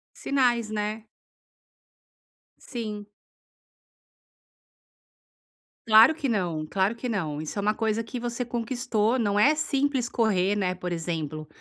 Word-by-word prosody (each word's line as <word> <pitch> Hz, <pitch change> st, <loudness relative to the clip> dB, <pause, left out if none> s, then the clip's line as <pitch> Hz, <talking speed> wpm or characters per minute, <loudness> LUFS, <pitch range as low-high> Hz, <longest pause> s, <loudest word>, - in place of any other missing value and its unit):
Sinais, 240 Hz, -5 st, +1 dB
né? 215 Hz, +1 st, -3 dB, 1.5 s
Sim. 215 Hz, -4 st, -6 dB, 2.8 s
Claro 225 Hz, +7 st, +7 dB
que 280 Hz, -5 st, -2 dB
não, 175 Hz, -7 st, -1 dB
claro 195 Hz, +6 st, 0 dB
que 245 Hz, +1 st, -4 dB
não, 155 Hz, -7 st, -2 dB
isso 160 Hz, +6 st, -5 dB
é -, -, +1 dB
uma 210 Hz, +1 st, +2 dB
coisa 225 Hz, 0 st, 0 dB
que 240 Hz, +2 st, -6 dB
você 240 Hz, +1 st, -3 dB
conquistou, 240 Hz, -1 st, -1 dB
não 205 Hz, -3 st, +1 dB
é 290 Hz, +8 st, +5 dB
simples 280 Hz, -4 st, 0 dB
correr, 205 Hz, -4 st, +1 dB
né, 185 Hz, -2 st, 0 dB
por 180 Hz, -1 st, -5 dB
exemplo, 155 Hz, -2 st, -4 dB
215 Hz, 120 wpm, -26 LUFS, 190-240 Hz, 2.8 s, Claro